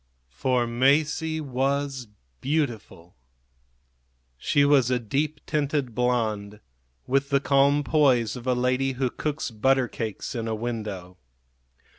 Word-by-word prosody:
For 120 - 0
Masie 150 +6 +1
was 135 -1 -2 0.3
beautiful. 120 - -3 1.2
She 140 - +2
was 140 -4 +4
a 125 - +2
deep 140 +7 -2
tinted 145 -4 -1
blonde, 110 -4 -1 0.5
with 135 +2 0
the 140 -1 +3
calm 140 +1 +3
poise 130 -8 +2
of 125 0 -8
a 125 - +2
lady 125 +2 +1
who 130 -1 -1
cooks 150 -4 -3
butter 130 +3 +2
cakes 110 -4 -5
in 115 -2 -3
a 110 - -1
window. 105 -6 -5
130 Hz, 120 wpm, -25 LUFS, 115-140 Hz, 1.2 s, was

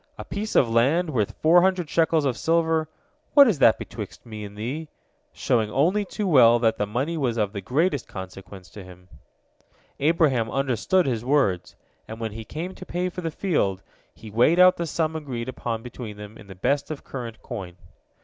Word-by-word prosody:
A - - -7
piece 215 +2 -5
of 125 - +5
land 140 +10 +2
worth 110 -7 -1
four 170 +3 +6
hundred 185 -2 +1
shekels 160 0 +2
of 130 -3 0
silver, 160 0 +1 0.5
what 285 -2 +9
is 195 -11 +1
that 115 -4 +6
betwixt - - -8
me 110 -2 -8
and 100 0 -10
thee?" 135 +9 -4 0.4
showing 110 -3 0
only 180 - +1
too 205 +2 -4
well 125 -9 +6
that 115 -1 +1
the 105 - 0
money 135 +10 -2
was 125 -6 -1
of 105 -2 0
the 100 - -5
greatest 145 - 0
consequence 95 -1 -10
to 100 - -10
him. 90 0 -15 0.9
Abraham 140 -7 +2
understood 135 - +1
his 120 -4 -1
words, 125 -10 +1 0.3
and 110 +1 -8
when 110 -1 -3
he 110 +2 -7
came 165 - -6
to - - -11
pay 180 +1 -2
for 180 - -7
the 165 - -2
field, 145 - -1 0.3
he 110 -1 -11
weighed 120 +10 +3
out 180 0 +6
the 170 - -3
sum 160 0 -1
agreed 130 -6 -5
upon 115 -3 -4
between 120 -4 -8
them 105 +1 -10
in 105 - -14
the 95 - -10
best 140 +10 0
of 155 -2 -6
current 115 -4 -7
coin. 95 -7 -7
130 Hz, 195 wpm, -24 LUFS, 110-165 Hz, 0.9 s, what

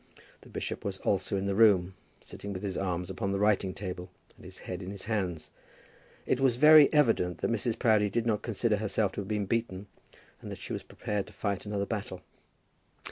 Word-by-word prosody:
The - - -16
bishop - - -5
was 100 -2 -3
also 100 +1 0
in 95 - -2
the 100 - 0
room, 95 -4 +4 0.3
sitting 100 0 -8
with 95 - -6
his 95 -2 -3
arms 90 -1 -2
upon 100 +1 -2
the 100 - 0
writing 100 -2 +2
table, 90 -1 -6 0.3
and - - -18
his - - -11
head 90 +1 -5
upon 90 - -6
his 100 -1 -7
hands. 95 -8 -2 0.7
It 130 - +1
was 135 -3 +3
very 150 +2 +8
evident 115 - +2
that - - -1
Mrs. 115 0 0
Proudie 110 -3 +3
did 115 +3 -1
not 110 -3 +1
consider 115 -1 0
herself 105 -1 0
to 100 - -4
have 95 - -8
been 105 -1 -1
beaten, 105 -3 -2 0.6
and - - -8
that - - -6
she - - -6
was - - -3
prepared 105 -2 -4
to - - -14
fight 100 -1 -3
another 100 -1 -1
battle. 105 -1 -5
100 Hz, 205 wpm, -29 LUFS, 95-110 Hz, 0.7 s, very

